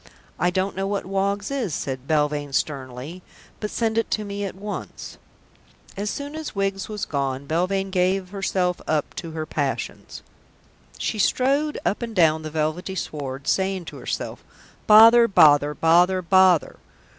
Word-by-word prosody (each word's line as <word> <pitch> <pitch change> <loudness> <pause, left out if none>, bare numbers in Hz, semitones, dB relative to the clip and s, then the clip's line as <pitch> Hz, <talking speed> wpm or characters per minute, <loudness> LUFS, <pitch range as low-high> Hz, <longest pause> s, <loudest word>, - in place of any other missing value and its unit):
"I 175 - +2
don't 185 +2 -1
know 195 +1 -2
what 200 0 -2
Woggs 200 +3 -1
is," 240 - -2
said 130 -1 -5
Belvane 150 -2 0
sternly, 135 +4 -3 0.4
"but 210 - -3
send 225 0 0
it 225 - -2
to 215 - -1
me 200 0 -4
at 190 - -6
once." 205 +2 -7 0.8
As 205 +2 -3
soon 285 +5 -5
as 315 -6 -6
Wiggs 195 0 -2
was 210 -1 -4
gone, 135 -1 -2
Belvane 185 +5 -1
gave 185 0 +1
herself 185 -3 -1
up 155 -2 -1
to 170 - -5
her 155 -1 -4
passions. - - -4 0.7
She 215 - -3
strode 275 +8 +1
up 205 - 0
and 230 -2 -5
down 160 -3 +4
the 155 - -6
velvety 155 +5 -2
sward, 140 -5 -5
saying 190 -2 0
to - - -9
herself, - - -5 0.4
"Bother! 230 +2 +8
Bother! 150 -6 +5
Bother! 175 +4 +3
Bother!" 185 -2 +4
185 Hz, 155 wpm, -23 LUFS, 155-205 Hz, 0.8 s, Bother